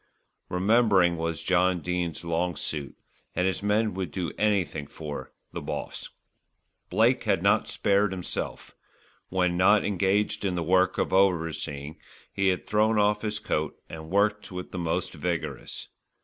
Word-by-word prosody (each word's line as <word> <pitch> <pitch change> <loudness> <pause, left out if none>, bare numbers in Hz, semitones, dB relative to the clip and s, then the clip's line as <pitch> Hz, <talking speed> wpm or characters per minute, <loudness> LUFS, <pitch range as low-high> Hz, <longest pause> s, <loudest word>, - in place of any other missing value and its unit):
Remembering 95 -2 +4
was 85 -1 -3
John 90 0 +2
Dene's 90 -1 -2
long 85 +1 0
suit; 75 -2 -2 0.4
and 90 - +1
his 95 +1 0
men 105 +1 +1
would 95 -2 -3
do 85 +3 -3
anything 95 -8 0
for 75 -1 -7 0.2
"the - - -4
Boss." - - -5 0.8
Blake - - +3
had - - +1
not - - +3
spared 100 0 +2
himself. 90 -2 -4 0.6
When 90 -1 +1
not 100 +3 +5
engaged 100 +2 +1
in 95 -2 0
the 85 - -1
work 95 +2 +3
of - - 0
overseeing, 80 -6 0 0.3
he 95 -1 +1
had 95 -1 +1
thrown 110 +1 +2
off 105 0 +3
his 105 -1 -1
coat 80 -6 -2 0.2
and 80 -1 -8
worked 105 +2 +1
with 90 0 -6
the 90 - -4
most 85 +1 -1
vigorous. 80 -3 -4
90 Hz, 150 wpm, -27 LUFS, 85-100 Hz, 0.8 s, not